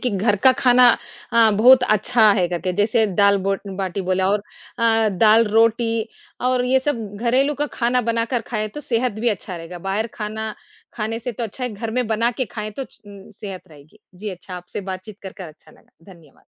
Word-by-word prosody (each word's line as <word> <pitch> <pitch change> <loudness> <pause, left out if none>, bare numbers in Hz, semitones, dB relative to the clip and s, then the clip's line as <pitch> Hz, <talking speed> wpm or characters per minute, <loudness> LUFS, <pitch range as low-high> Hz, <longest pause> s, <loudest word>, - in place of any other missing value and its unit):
कि 250 - -1
घर 205 +2 +1
का 260 - +8
खाना 250 -1 +6 0.4
अ, 230 -1 +5
बहुत 245 +5 +6
अच्छा 215 0 +3
है 180 - +2
करके 180 +1 -2
जैसे 215 +3 +2
दाल 200 0 +5
ब 195 0 +1 0.2
बाटी 190 0 -3
बोला 185 +1 0
और 205 0 0 0.4
अ, 225 -1 +3
दाल-रोटी 225 +1 +3 0.4
और 255 -1 +1
ये 260 +1 +3
सब 260 -5 -2
घरेलू 255 +6 +1
का 295 +1 -2
खाना 245 +1 +1
बनाकर 230 +1 -1
खाएँ 215 -3 -2
तो 295 - -5
सेहत 245 -3 -1
भी 240 - +2
अच्छा 190 -3 -4
रहेगा। 170 +1 -8
बाहर 215 +4 0
खाना 220 0 -5 0.4
खाने 225 0 -3
से 240 +1 -5
तो 235 +2 -4
अच्छा 240 +4 -6
है 250 - -2
घर 220 +2 -5
में 250 0 -1
बनाके 230 +3 0
खाएँ 215 0 -4
तो - - -2
च - - -20 0.4
सेहत 195 -3 -7
रहेगी। 155 +7 -18 0.2
जी 205 +4 -7
अच्छा, 185 0 -9
आपसे 180 +3 -7
बातचीत 190 +2 -8
करके 190 -1 -9
अच्छा 155 -2 -14
लगा। - - -24 0.2
धन्यवाद। 160 -5 -21
220 Hz, 190 wpm, -21 LUFS, 195-235 Hz, 0.4 s, का